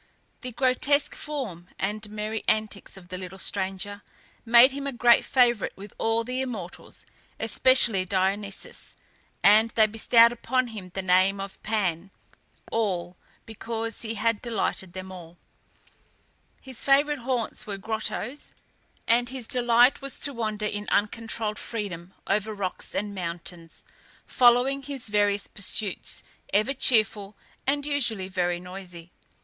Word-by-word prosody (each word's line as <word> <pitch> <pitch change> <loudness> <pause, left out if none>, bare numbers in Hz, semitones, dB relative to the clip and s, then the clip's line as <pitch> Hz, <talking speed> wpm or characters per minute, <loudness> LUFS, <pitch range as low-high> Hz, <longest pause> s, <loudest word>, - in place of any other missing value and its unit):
The 250 - -6
grotesque 270 +4 +2
form 230 - -5
and 210 +2 -3
merry 215 +1 -4
antics 215 -2 -1
of 175 -2 -14
the 185 0 -5
little 185 0 -8
stranger 195 +1 -3 0.4
made 235 +3 +7
him 280 +1 -4
a - - 0
great 240 -1 +5
favourite 240 -4 +2
with 200 +1 -10
all 225 +1 +1
the 250 +2 -2
immortals, 220 -9 -7 0.3
especially 225 -3 +3
Dionysus; 195 +2 -2 0.5
and 215 +3 +6
they 220 -1 +4
bestowed 230 +2 +5
upon 250 +1 0
him 205 -5 -8
the 190 - -2
name 185 +2 +3
of 195 0 -7
Pan 195 -5 -1 0.6
(all), 185 -6 -1 0.3
because 225 0 -4
he 225 -1 -3
had 225 0 0
delighted 205 -6 -2
them 185 +1 -7
all. 175 -2 -11 1.2
His 260 -3 -5
favourite 285 +1 +3
haunts 240 -3 -2
were 200 -2 -4
grottoes, 220 +6 -4 0.5
and 240 +1 +3
his 255 -3 -6
delight 245 +1 +4
was 275 -1 -5
to 285 - -1
wander 215 -3 -2
in 205 0 -3
uncontrolled 215 0 -1
freedom 195 -6 -5
over 210 +2 0
rocks 190 -2 -3
and 205 0 -2
mountains, 170 -2 -6 0.4
following 250 +3 +4
his 275 -4 -6
various 205 -1 +2
pursuits, 200 -1 -2 0.3
ever 215 +7 +2
cheerful, 215 -5 +1 0.3
and 285 +1 +1
usually 235 -10 0
very 175 -2 -1
noisy. 180 -2 -8
215 Hz, 130 wpm, -26 LUFS, 195-240 Hz, 1.2 s, made